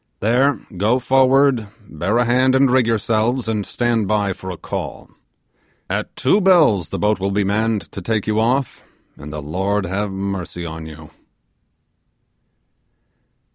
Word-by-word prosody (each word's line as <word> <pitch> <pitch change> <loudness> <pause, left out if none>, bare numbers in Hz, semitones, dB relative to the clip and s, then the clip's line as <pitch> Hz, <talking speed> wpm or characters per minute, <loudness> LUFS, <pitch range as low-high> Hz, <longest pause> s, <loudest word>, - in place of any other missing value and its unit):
There, 125 +6 +2 0.2
go 110 +7 +2
forward: 130 -2 +3 0.2
bear 90 +8 -1
a 120 - +2
hand 130 +2 +3
and 135 -1 +4
rig 130 -2 +3
yourselves, 115 +2 0
and 110 -2 -1
stand 120 -4 0
by 105 -2 0
for 95 - -9
a 90 - -6
call. - - -6 0.8
At - - -3
two 195 +11 +2
bells 155 - +4
the - - -4
boat 105 0 +1
will 95 +1 -1
be 100 +1 0
manned 110 +2 0
to 100 - -7
take 110 +2 -1
you 110 0 0
off, 125 +3 0 0.3
and 75 +1 -10
the 75 -1 -6
Lord 95 +6 -1
have 100 +3 -2
mercy 95 -3 -4
on 80 -1 -7
you! 75 -1 -12
110 Hz, 150 wpm, -19 LUFS, 95-125 Hz, 0.8 s, and